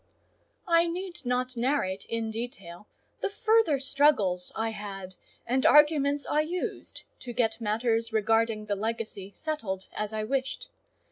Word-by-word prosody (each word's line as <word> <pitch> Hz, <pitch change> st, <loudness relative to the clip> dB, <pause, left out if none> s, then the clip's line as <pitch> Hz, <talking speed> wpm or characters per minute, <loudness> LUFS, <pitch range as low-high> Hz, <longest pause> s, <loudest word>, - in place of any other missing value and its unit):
I 335 Hz, 0 st, +4 dB
need 350 Hz, 0 st, -5 dB
not 250 Hz, +1 st, 0 dB
narrate 235 Hz, -6 st, 0 dB
in 225 Hz, -1 st, -2 dB
detail 220 Hz, -6 st, -7 dB, 0.3 s
the -, -, 0 dB
further 435 Hz, -, +3 dB
struggles 255 Hz, -11 st, +2 dB
I 225 Hz, 0 st, -1 dB
had, 195 Hz, -3 st, -7 dB, 0.3 s
and 255 Hz, +2 st, +1 dB
arguments 290 Hz, -1 st, +5 dB
I 300 Hz, -, +2 dB
used, 345 Hz, +4 st, -4 dB, 0.2 s
to 245 Hz, -2 st, -7 dB
get 225 Hz, -1 st, 0 dB
matters 230 Hz, +1 st, 0 dB
regarding 225 Hz, 0 st, +1 dB
the 205 Hz, -1 st, -1 dB
legacy 215 Hz, -2 st, -4 dB
settled 220 Hz, -12 st, -3 dB
as 210 Hz, 0 st, -2 dB
I 215 Hz, 0 st, -2 dB
wished. 265 Hz, +3 st, -2 dB
230 Hz, 135 wpm, -28 LUFS, 215-285 Hz, 0.3 s, arguments